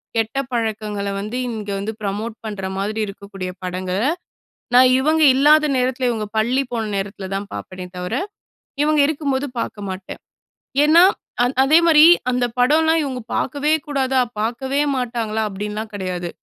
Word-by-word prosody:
கெட்ட 225 +3 -1
பழக்கங்கள 215 -3 -2
வந்து 215 +5 -4
இங்க 215 -3 -5
வந்து 205 +3 -3
ப்ரமோட் 210 +3 -3
பண்ற 205 -3 -5
மாதிரி 210 +3 -2
இருக்கக்கூடிய 195 -2 -7
படங்கள, 185 0 -3 0.8
நான் 255 0 +7
இவங்க 310 +4 +2
இல்லாத 300 +3 +5
நேரத்தில, 255 0 0
இவுங்க 220 -3 -3
பள்ளி 245 +5 +2
போன 225 -3 -2
நேரத்தில 195 0 -5
தான் 200 +1 -5
பாப்பேனே 185 -1 -7
தவிர, 180 0 -4 0.7
இவுங்க 305 0 +3
இருக்கும்போது 285 -3 -1
பாக்க 215 - -4
மாட்டேன். 185 0 -7 0.6
ஏன்னா 325 +4 +7 0.4
அந் 245 +2 +1
அதே 300 +4 +5
மாரி 310 -2 +7 0.3
அந்த 250 0 +1
படம்லாம் 320 +6 +3
இவுங்க 265 -3 -4
பாக்கவே 285 +3 -1 0.2
கூடாதா? 265 -2 0 0.2
பாக்கவே 245 +6 -1 0.2
மாட்டாங்களா? 230 -3 -2
அப்டின்லாம் 210 +2 -5
கிடையாது. 180 -3 -4
225 Hz, 140 wpm, -20 LUFS, 205-270 Hz, 0.8 s, நான்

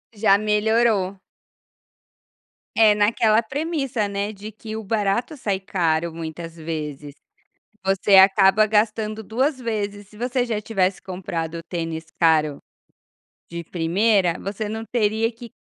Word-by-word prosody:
Já 200 -1 +4
melhorou. 210 -2 +1 1.6
É, 215 -2 +6
naquela 215 +1 +3
premissa, 270 -3 -2
né, 200 +1 -3
de 210 +2 -9
que 215 +1 -8
o 220 - -5
barato 220 +7 -1
sai 200 -6 -1
caro, 170 -3 0
muitas 165 0 -7
vezes. 150 -3 -6 0.7
Você 195 +1 +3
acaba 195 +2 +6
gastando 215 0 0
2 260 +6 -1
vezes. 205 -3 -4
Se 210 +1 -17
você 245 +1 -1
já 220 -3 -2
tivesse 195 -3 0
comprado 170 -3 -5
tênis 165 -2 -4
caro 155 -3 +3 0.9
de 170 0 -5
primeira, 180 +2 +1
você 205 +2 -4
não 220 +1 -4
teria 220 -1 +1
que 235 0 -12
205 Hz, 125 wpm, -22 LUFS, 180-220 Hz, 1.6 s, É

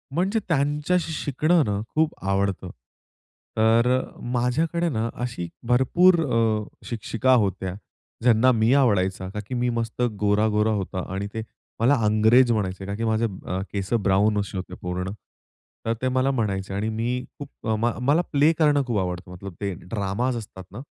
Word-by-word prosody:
म्हणजे 195 +6 +1
त्यांच्याशी 150 +3 +1
शिकणं 155 +3 +2
ना 100 -2 -1 0.2
खूप 155 0 +2
आवडतं. 100 0 0 0.9
तर 115 +2 +4 0.5
माझ्याकडे 160 +8 0
ना 115 -3 -1
अशी 120 -9 -4 0.2
भरपूर 155 +9 +5
अ, 115 -4 +1 0.2
शिक्षिका 120 +2 0
होत्या 95 -5 +1 0.5
ज्यांना 120 +1 +5
मी 115 +1 +3
आवडायचा, 95 -8 +2
का 105 - -5
की - - -6
मी 120 0 0
मस्त 115 0 -3 0.2
गोर-गोरा 105 +1 +2
होता 95 -2 -3
आणि 100 +1 -3
ते 110 - -3 0.4
मला 125 +6 +4
अंग्रेज 110 +4 +5
म्हणायचे, 95 -3 -2
कारण 100 +1 -4
की 115 - -3
अ, - - 0
माझे 110 +1 +1 0.5
केस 100 +2 -3
ब्राउन 105 +2 +3
असे 100 -1 -4
होते 95 - -6
पूर्ण. 90 +1 -3 0.7
तर 115 - +1
ते 130 - +1
मला 130 +1 +2
म्हणायचे 100 -6 -2
आणि 105 +3 -1
मी 120 +3 -2 0.2
खूप 145 -5 -10
म 115 +2 +1 0.2
मला 150 +5 +4
प्ले 150 +2 +4
करणं 145 -3 +4
खूप 120 -3 0
आवडतं, 90 -1 -4
मतलब 90 +1 -8
ते 100 -1 -1 0.2
ड्रामा 100 +3 -1
असतात 110 -6 -6
ना 105 - -8
115 Hz, 160 wpm, -24 LUFS, 100-130 Hz, 0.9 s, भरपूर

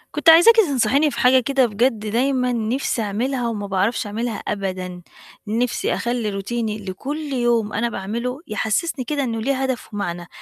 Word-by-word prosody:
كنت 300 +2 +4
عايزاكِ 345 +8 +8
تنصحيني 285 - +3
في - - -5
حاجة 260 0 +5
كده، 270 0 +2
بجد 230 +1 +1
دايمًا 250 +4 0
نِفْسي 235 +2 -1
أعملها 240 +5 -1
وما 210 -3 -3
باعرفش 200 +4 0
أعملها 225 +2 -3
أبدًا. 185 -3 -4 0.5
نِفْسي 230 +3 0
أخلّي 235 -2 -1
روتيني 210 +2 -3
اللي 195 -3 -6
كل 290 +7 -5
يوم 235 -4 +1
أنا 235 +3 0
باعمله 235 +6 -4
يحسّسني 245 +6 -1
كده 285 +1 -1
إنه 225 -3 -2
ليه 275 +4 0
هدف 260 -4 -3
ومعنى، 175 -4 -4
235 Hz, 160 wpm, -21 LUFS, 210-265 Hz, 0.5 s, عايزاكِ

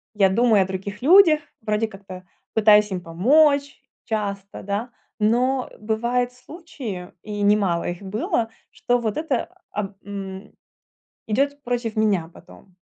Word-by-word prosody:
я 195 -2 +4
думаю 220 -1 +4
о - - -6
других 200 +3 -6
людях, 320 0 +7 0.2
вроде 215 +1 0
как-то 190 -2 -11 0.3
пытаюсь 210 -1 +5
им 180 -1 -3
помочь 280 - +3 0.2
часто, 200 -3 -4
да, 205 +5 -3 0.3
но 250 +4 +1
бывают 235 +3 0
случаи, 250 - -8
и 210 -1 -5
немало 200 -4 +2
их 175 +2 -6
было, 220 +3 -1 0.2
что 245 0 0
вот 220 0 -2
это, 300 -6 -1 0.2
а, 205 -1 -4
м, 195 0 -7 0.7
идёт 280 +6 0
против 240 -3 -3
меня 195 -6 +1
потом. 185 -2 -17
215 Hz, 130 wpm, -23 LUFS, 195-245 Hz, 0.7 s, людях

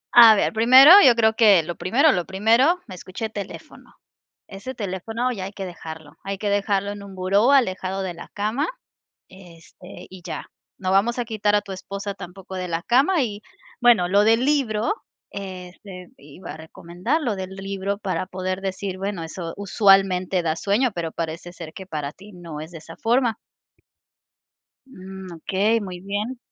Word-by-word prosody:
A 230 -2 +10
ver, - - 0
primero 255 +7 +8
yo 245 -3 +7
creo 220 -1 +3
que 200 -7 +5
lo 175 +1 -5
primero, 275 - +3
lo 180 -7 -1
primero, 230 - +3
escuché 185 +4 -6
teléfono. 200 -3 -9 0.5
Ese 210 +7 -8
teléfono 225 +5 -3
ya 195 -6 -5
hay 195 - -6
que 195 -2 -6
dejarlo, 160 -3 -10
hay 195 0 -5
que 205 -1 -2
dejarlo 200 0 0
en 205 0 -8
un 195 -1 -11
buró 200 +7 +2
alejado 190 -7 +1
de 180 -3 -4
la - - -10
cama, 220 +9 -1 0.6
este, 175 -3 -14
y 185 -1 -12
ya. 175 - -7 0.3
No 185 -1 -2
vamos 225 +6 +2
a 245 - 0
quitar 210 -2 0
a 205 - +2
tu 195 - -10
esposa 195 +1 -6
tampoco 190 0 -10
de 185 -1 -4
la 165 0 -2
cama 285 +7 +3
y, 210 -2 -5 0.4
bueno, 230 -8 +4
lo 200 +2 +4
del 225 +3 +4
libro, 255 - +1 0.4
este, 185 -1 -9
iba 150 +5 -11
a - - -10
recomendar 175 - -3
lo 225 -8 -2
del 185 0 -6
libro 195 0 -4
para 190 -2 -2
poder 185 0 -4
decir: 190 0 -4
"Bueno, 195 -3 -4
eso 165 0 -6
usualmente 195 -2 +3
da 160 0 -1
sueño", 215 +8 +1
pero 165 -2 -4
parece 165 +1 -5
ser 165 -3 -9
que 190 - -9
para 150 -4 -4
ti 200 +4 -15
no 170 -4 -9
es 160 +3 -8
de 165 - -9
esa 165 +1 -13
forma. 235 0 +1 1.5
Mm, 190 -4 -10
okey, 200 +7 +1
muy 185 -3 -7
bien. 205 +6 -4
195 Hz, 175 wpm, -23 LUFS, 180-220 Hz, 1.5 s, A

